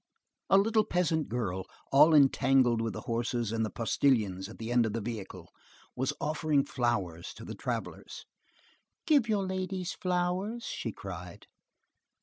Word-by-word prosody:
A 195 - +6
little 215 +2 +3
peasant 165 -5 0
girl, 95 -5 -3 0.2
all 150 +4 +7
entangled 130 -4 +4
with 115 -2 -2
the - - -6
horses 115 -1 -2
and 115 0 0
the 110 - -1
postilions 105 -5 +1
at 110 - -11
the 115 +1 -5
end 120 -2 +3
of 105 - -4
the 115 - -1
vehicle, 100 -6 -7 0.4
was 130 +1 0
offering 150 -1 +1
flowers 100 - -2
to - - -10
the - - -6
travellers. - - -5 0.8
"Give 285 -8 +3
your 205 -3 +1
ladies 185 -1 -3
flowers!" 185 +5 -1
she - - -4
cried. - - -9
130 Hz, 145 wpm, -30 LUFS, 110-180 Hz, 0.8 s, all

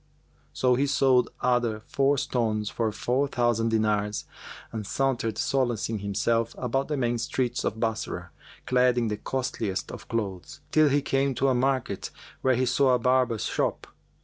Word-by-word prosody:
Then 125 -1 +3
he 140 +2 +2
sold 130 -2 +3
other 120 -3 +1
four 140 +1 +2
stones 115 -7 -1
for 115 -2 -1
four 130 +6 0
thousand 120 -3 +1
dinars 105 -2 0 0.5
and 110 -1 -4
sauntered 125 -5 0
solacing 120 -6 0
himself 115 +3 0
about 135 +2 -1
the 150 - -2
main 120 -2 0
streets 125 0 -1
of 110 - -2
Bassorah, 110 -1 -3 0.3
clad 125 -1 +3
in 115 -2 +1
the 105 - -2
costliest 110 -5 -3
of - - -9
clothes; 100 -6 -4
till 155 -1 +5
he 140 0 +2
came 135 0 +1
to 135 +2 +2
a - - +3
market, 130 -5 0 0.3
where 130 -1 +3
he 130 +2 +1
saw 130 +1 +3
a - - +3
barber's 125 -2 +1
shop. - - -1
120 Hz, 160 wpm, -27 LUFS, 110-130 Hz, 0.5 s, till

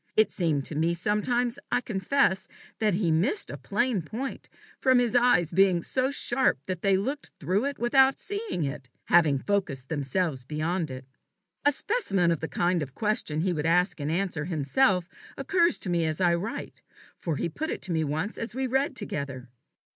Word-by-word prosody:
It 215 - +4
seemed 155 -6 0
to - - -5
me 165 +3 +1
sometimes, 235 +7 0
I 245 - +3
confess, 200 -1 +1 0.3
that 210 -4 +2
he 180 -4 +1
missed 180 - +1
a - - -5
plain 240 -6 0
point 235 - -6 0.3
from 260 -1 +4
his 245 -1 +1
eyes 240 -10 +4
being 180 -1 +3
so 260 0 0
sharp 270 - +1
that 185 0 -4
they 195 -1 +3
looked 270 +9 -3
through 185 - 0
it 280 -1 -2
without 265 +3 +4
seeing 410 - -3
it, 135 -3 -5 0.2
having 160 -5 +5
focused 140 -7 -2
themselves 145 -1 -1
beyond 155 +4 -2
it. 130 0 -8 0.6
A 290 - +6
specimen 200 - +1
of 165 - 0
the 160 - -3
kind 175 0 0
of 135 -2 -6
question 210 -8 0
he 180 +1 +1
would 155 -1 -1
ask 180 +1 +2
and 145 +1 -2
answer 165 -3 -1
himself, 180 - +1 0.3
occurs 350 -3 +2
to 185 - -4
me 170 -2 +1
as 155 -1 -2
I 175 -2 +3
write, 190 +7 -4 0.3
for 165 -3 -3
he - - -1
put 310 - -4
it - - -4
to 185 - -4
me 160 -1 +1
once 155 +8 -2
as 230 0 -4
we 265 0 -1
read 265 +2 0
together. 140 - -4
185 Hz, 185 wpm, -27 LUFS, 160-245 Hz, 0.6 s, A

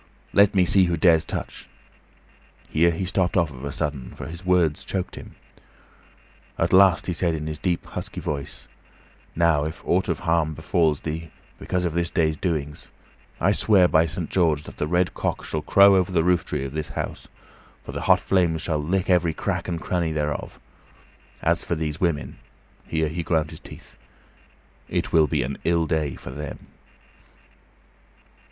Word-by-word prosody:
Let 100 0 +5
me 95 -2 +4
see 95 +1 +5
who 85 -1 0
dares 80 0 +4
touch - - -6 0.5
" - - -31
Here 85 +2 +4
he 85 +3 -2
stopped 95 0 0
of 75 -7 -1
a 70 - -3
sudden, 75 -6 -4
for - - -7
his 85 +5 -8
words 90 -5 +2
choked 95 -2 -3
him. - - -10 1.2
At - - 0
last 95 -3 +6
he 90 - -2
said, 85 -1 0
in 75 0 -5
a 80 - -2
deep, 85 +3 -2
husky - - -6
voice, 70 -1 -5 0.7
"Now, 85 -3 +3
if 80 +2 -6
aught 95 +2 +1
of 85 - -1
harm 80 -2 +1
befalls 80 -1 +1
thee 80 +1 -5 0.3
because 90 -1 -2
of 85 - -1
this 85 0 0
day's 80 -3 +1
doings, 75 -4 -3 0.5
I 95 - +3
swear 100 -3 +4
by 80 0 +3
Saint 80 0 -5
George 80 -5 +2
that - - -12
the 75 - -1
red 90 +2 +1
cock - - -3
shall 80 - -3
crow 100 +5 +6
over 95 0 +2
the 85 -3 +2
rooftree 90 -6 0
of 70 - -6
this 80 0 -3
house, - - -5 0.6
for - - -6
the - - -5
hot - - +4
flames 85 -4 +1
shall 80 -3 -1
lick 90 +5 -1
every 90 -3 +2
crack - - -2
and 85 -2 -2
cranny 85 -1 -1
thereof. 75 -1 -3 0.8
As - - +2
for 85 - -2
these 80 -1 -4
women" 85 -5 -1 0.5
here 80 -1 0
he 80 +3 -3
ground 80 -2 0
his 80 - -8
teeth - - -13 0.9
"it - - -2
will 80 -2 +5
be - - 0
an 70 +2 -5
ill 85 -1 +2
day 75 -3 -1
for 60 - -9
them!" 75 +1 -7
80 Hz, 175 wpm, -24 LUFS, 75-90 Hz, 1.2 s, last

